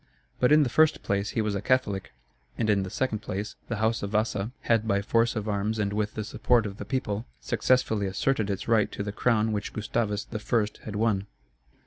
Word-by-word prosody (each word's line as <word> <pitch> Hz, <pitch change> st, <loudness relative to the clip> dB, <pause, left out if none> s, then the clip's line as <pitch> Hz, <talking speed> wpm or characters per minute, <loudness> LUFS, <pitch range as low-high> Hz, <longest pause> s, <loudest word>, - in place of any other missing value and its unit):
But 125 Hz, -, +4 dB
in 150 Hz, 0 st, +7 dB
the 130 Hz, -, 0 dB
first 155 Hz, +5 st, +3 dB
place 100 Hz, 0 st, 0 dB
he 110 Hz, -, +3 dB
was 105 Hz, -1 st, -1 dB
a 100 Hz, -, -2 dB
Catholic; 105 Hz, -5 st, 0 dB, 0.5 s
and 110 Hz, -2 st, +2 dB
in 100 Hz, -1 st, +2 dB
the 95 Hz, -, -4 dB
second 120 Hz, 0 st, -1 dB
place, 105 Hz, 0 st, -5 dB
the 115 Hz, -, -2 dB
house 110 Hz, +2 st, +1 dB
of 100 Hz, -, -3 dB
Vasa, 105 Hz, -1 st, 0 dB
had 115 Hz, -1 st, +2 dB
by 100 Hz, -2 st, +2 dB
force 115 Hz, +3 st, +2 dB
of 110 Hz, -1 st, -3 dB
arms 105 Hz, +1 st, -1 dB
and 100 Hz, -1 st, 0 dB
with 105 Hz, 0 st, -1 dB
the 110 Hz, -, -2 dB
support 115 Hz, +2 st, +2 dB
of 100 Hz, -1 st, -5 dB
the -, -, -6 dB
people, 115 Hz, -4 st, -2 dB
successfully 110 Hz, -5 st, +1 dB
asserted 110 Hz, +2 st, 0 dB
its 100 Hz, -1 st, -3 dB
right 110 Hz, -3 st, +3 dB
to 100 Hz, -, -3 dB
the 100 Hz, -, -3 dB
crown 110 Hz, 0 st, +2 dB
which 105 Hz, -1 st, -3 dB
Gustavus 105 Hz, -1 st, -1 dB
I. 110 Hz, +1 st, +1 dB, 0.2 s
had 105 Hz, -, -5 dB
won. 105 Hz, -2 st, +1 dB
110 Hz, 210 wpm, -27 LUFS, 100-115 Hz, 0.5 s, in